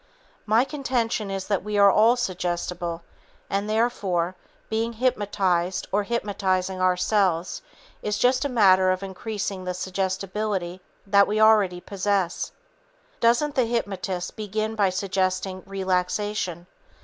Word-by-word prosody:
My 220 Hz, +3 st, +4 dB
contention 245 Hz, -7 st, -2 dB
is 195 Hz, -1 st, -3 dB
that 200 Hz, -3 st, -1 dB
we 210 Hz, 0 st, -2 dB
are 200 Hz, -1 st, +7 dB
all 225 Hz, +4 st, +5 dB
suggestible 175 Hz, -5 st, -3 dB, 0.5 s
and, 200 Hz, +2 st, -1 dB
therefore, 200 Hz, -6 st, 0 dB, 0.3 s
being 225 Hz, +1 st, -1 dB
hypnotized 195 Hz, -7 st, 0 dB
or 205 Hz, -, +2 dB
hypnotizing 195 Hz, -4 st, -1 dB
ourselves 185 Hz, -1 st, +1 dB, 0.4 s
is 210 Hz, 0 st, -1 dB
just 250 Hz, +4 st, +3 dB
a 285 Hz, -, -1 dB
matter 190 Hz, -6 st, +5 dB
of 185 Hz, +1 st, 0 dB
increasing 195 Hz, 0 st, -4 dB
the 180 Hz, 0 st, -3 dB
suggestibility 190 Hz, 0 st, -2 dB, 0.2 s
that 200 Hz, 0 st, +5 dB
we 215 Hz, +1 st, 0 dB
already 210 Hz, -5 st, +4 dB
possess. 195 Hz, -2 st, -1 dB, 0.7 s
Doesn't 240 Hz, +6 st, +3 dB
the 255 Hz, -3 st, +2 dB
hypnotist 195 Hz, -6 st, -3 dB
begin 215 Hz, +1 st, -2 dB
by 205 Hz, -3 st, +2 dB
suggesting 185 Hz, 0 st, -1 dB
relaxation? 190 Hz, -1 st, -1 dB
195 Hz, 120 wpm, -25 LUFS, 185-215 Hz, 0.7 s, are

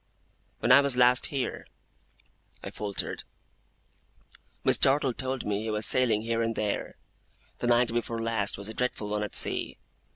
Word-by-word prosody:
'When 120 Hz, -, +2 dB
I 135 Hz, +2 st, +8 dB
was 140 Hz, -3 st, -1 dB
last 125 Hz, 0 st, +4 dB
here,' 135 Hz, -3 st, -4 dB, 1.0 s
I -, -, -6 dB
faltered, 100 Hz, -1 st, -4 dB, 1.4 s
'Miss -, -, +4 dB
Dartle 135 Hz, -1 st, +3 dB
told 130 Hz, +1 st, -3 dB
me 105 Hz, 0 st, -1 dB
he 110 Hz, -, -4 dB
was 105 Hz, 0 st, 0 dB
sailing 115 Hz, -4 st, +3 dB
here 115 Hz, 0 st, -1 dB
and 115 Hz, 0 st, -1 dB
there. 105 Hz, -1 st, -3 dB, 0.6 s
The -, -, -2 dB
night 120 Hz, 0 st, +3 dB
before 115 Hz, -1 st, -2 dB
last 115 Hz, -3 st, -1 dB
was 100 Hz, +1 st, -6 dB
a 110 Hz, -, -7 dB
dreadful 120 Hz, -3 st, -3 dB
one 105 Hz, 0 st, -2 dB
at 105 Hz, -, -3 dB
sea. -, -, 0 dB
115 Hz, 160 wpm, -28 LUFS, 105-125 Hz, 1.4 s, I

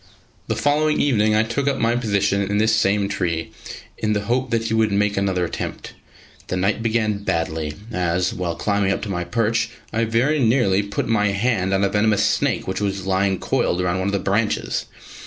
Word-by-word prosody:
The -, -, -1 dB
following 150 Hz, +1 st, +1 dB
evening 110 Hz, -6 st, +2 dB
I 110 Hz, -, +4 dB
took 125 Hz, +5 st, -2 dB
up 140 Hz, -1 st, +1 dB
my 115 Hz, +1 st, +1 dB
position 100 Hz, -4 st, +1 dB
in 100 Hz, +1 st, -1 dB
this 110 Hz, +1 st, +3 dB
same 100 Hz, -2 st, +2 dB
tree, 85 Hz, -5 st, -2 dB, 0.5 s
in 110 Hz, 0 st, 0 dB
the 105 Hz, -, 0 dB
hope 125 Hz, +4 st, -1 dB
that 115 Hz, -1 st, 0 dB
he 115 Hz, 0 st, -2 dB
would 110 Hz, -1 st, +2 dB
make 100 Hz, 0 st, +1 dB
another 95 Hz, -2 st, 0 dB
attempt. -, -, -6 dB, 0.5 s
The 90 Hz, -, -2 dB
night 95 Hz, +4 st, 0 dB
began 110 Hz, -3 st, 0 dB
badly, 80 Hz, -3 st, -2 dB, 0.2 s
as, 90 Hz, -1 st, 0 dB
while 85 Hz, -2 st, -3 dB
climbing 100 Hz, +1 st, 0 dB
up -, -, -2 dB
to 105 Hz, -, -4 dB
my 90 Hz, -2 st, -2 dB
perch 115 Hz, +6 st, 0 dB, 0.2 s
I 115 Hz, +1 st, +1 dB
very 125 Hz, +7 st, +1 dB
nearly 115 Hz, -6 st, +3 dB
put 100 Hz, 0 st, -3 dB
my 105 Hz, -2 st, +2 dB
hand 100 Hz, -1 st, 0 dB
on 95 Hz, 0 st, +2 dB
a 100 Hz, -, +3 dB
venomous 105 Hz, 0 st, +2 dB
snake -, -, 0 dB
which 95 Hz, -, -2 dB
was 100 Hz, -2 st, -2 dB
lying 95 Hz, 0 st, +1 dB
coiled 85 Hz, -, 0 dB
round 90 Hz, 0 st, 0 dB
one 95 Hz, -, -1 dB
of -, -, 0 dB
the -, -, +2 dB
branches. 105 Hz, +3 st, -1 dB
105 Hz, 200 wpm, -21 LUFS, 95-115 Hz, 0.5 s, I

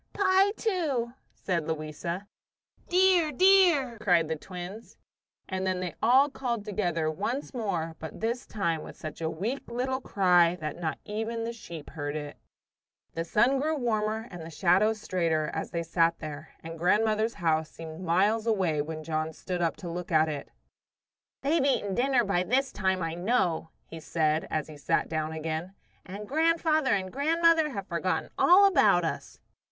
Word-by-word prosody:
"Pie, 385 Hz, 0 st, +4 dB
too," 295 Hz, -, -1 dB, 0.2 s
said 170 Hz, -5 st, -2 dB
Louisa. 160 Hz, +4 st, -4 dB, 0.6 s
"Dear, 360 Hz, -3 st, +4 dB
dear!" 335 Hz, -, +4 dB
cried 175 Hz, -6 st, +2 dB
the 160 Hz, -, 0 dB
twins. 180 Hz, +6 st, -9 dB, 0.5 s
And 190 Hz, 0 st, -2 dB
then 185 Hz, -1 st, 0 dB
they 180 Hz, -1 st, -4 dB
all 260 Hz, +5 st, +5 dB
called 240 Hz, -6 st, -3 dB
together 175 Hz, -7 st, -1 dB
once 235 Hz, -, -3 dB
more, 175 Hz, -9 st, -2 dB
but 160 Hz, -2 st, -8 dB
this 235 Hz, +3 st, -2 dB
time 170 Hz, -7 st, -1 dB
with -, -, -10 dB
such 155 Hz, +1 st, -8 dB
a 160 Hz, -, 0 dB
weak 215 Hz, +13 st, -4 dB
little 260 Hz, +2 st, -2 dB
cry 180 Hz, -6 st, +3 dB
that 155 Hz, -1 st, -5 dB
not 160 Hz, -3 st, -2 dB
even 225 Hz, +2 st, -3 dB
the 230 Hz, +1 st, -3 dB
sheep 170 Hz, -9 st, -10 dB
heard 145 Hz, -1 st, -4 dB
it. 145 Hz, -1 st, -5 dB, 0.8 s
The 165 Hz, -, -2 dB
sun 235 Hz, +10 st, +2 dB
grew 310 Hz, +3 st, 0 dB
warmer 220 Hz, -2 st, -1 dB
and 175 Hz, -2 st, -8 dB
the 160 Hz, -, -8 dB
shadows 195 Hz, +6 st, +2 dB
straighter 165 Hz, -6 st, 0 dB
as -, -, -3 dB
they 170 Hz, -1 st, -3 dB
sat 165 Hz, 0 st, +2 dB
there, 155 Hz, -1 st, -8 dB
and 165 Hz, 0 st, -8 dB
grandmother's 215 Hz, +5 st, +2 dB
house 160 Hz, -4 st, 0 dB
seemed 160 Hz, +1 st, -9 dB
miles 200 Hz, +6 st, +2 dB
away 185 Hz, -9 st, +1 dB
when 155 Hz, +1 st, -6 dB
John 155 Hz, 0 st, -2 dB
stood 180 Hz, +2 st, -4 dB
up 165 Hz, -1 st, +1 dB
to 180 Hz, -, -8 dB
look 175 Hz, +1 st, -5 dB
at 155 Hz, 0 st, +4 dB
it. 150 Hz, -2 st, -5 dB, 0.9 s
"They've 295 Hz, +2 st, +2 dB
eaten 255 Hz, -8 st, +1 dB
dinner 250 Hz, +2 st, +2 dB
by 195 Hz, -4 st, +1 dB
this 260 Hz, +8 st, +1 dB
time, 190 Hz, -2 st, 0 dB
I 165 Hz, 0 st, -2 dB
know," 175 Hz, -4 st, 0 dB, 0.2 s
he 165 Hz, -, -9 dB
said 155 Hz, -1 st, 0 dB
as 155 Hz, -2 st, -2 dB
he 155 Hz, -2 st, -11 dB
sat 140 Hz, -, 0 dB
down 155 Hz, -1 st, -2 dB
again; 160 Hz, +4 st, -4 dB, 0.3 s
"and 200 Hz, +2 st, -8 dB
grandfather 315 Hz, -3 st, +2 dB
and 185 Hz, -1 st, -4 dB
grandmother 320 Hz, +2 st, +3 dB
have 200 Hz, -8 st, -5 dB
forgotten 175 Hz, 0 st, -2 dB
all 380 Hz, +3 st, +7 dB
about 390 Hz, -, +4 dB
us." -, -, -5 dB
190 Hz, 170 wpm, -28 LUFS, 165-245 Hz, 0.9 s, all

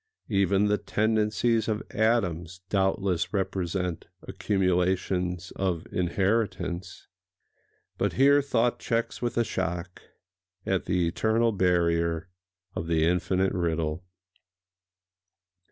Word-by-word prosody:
Even 100 Hz, -1 st, +2 dB
the 105 Hz, 0 st, +2 dB
tendencies 110 Hz, +1 st, +1 dB
of 110 Hz, -1 st, -1 dB
atoms 90 Hz, -6 st, 0 dB
doubtless 95 Hz, -3 st, 0 dB
represent 90 Hz, -3 st, -2 dB, 0.2 s
accumulations 90 Hz, -2 st, 0 dB
of 90 Hz, -4 st, -1 dB
inheritance—— 95 Hz, 0 st, -1 dB, 0.9 s
but -, -, +1 dB
here 140 Hz, +2 st, +5 dB
thought 120 Hz, -3 st, +1 dB
checks 115 Hz, 0 st, -2 dB
with 120 Hz, -1 st, -2 dB
a 120 Hz, -, +4 dB
shock 85 Hz, -3 st, -4 dB, 0.6 s
at 95 Hz, -1 st, 0 dB
the 90 Hz, -2 st, +1 dB
eternal 110 Hz, +6 st, +1 dB
barrier 85 Hz, -3 st, +1 dB, 0.4 s
of 80 Hz, -, -4 dB
the 80 Hz, -1 st, +2 dB
Infinite 90 Hz, +2 st, +1 dB
Riddle. 80 Hz, -2 st, -1 dB
95 Hz, 95 wpm, -27 LUFS, 85-105 Hz, 0.9 s, here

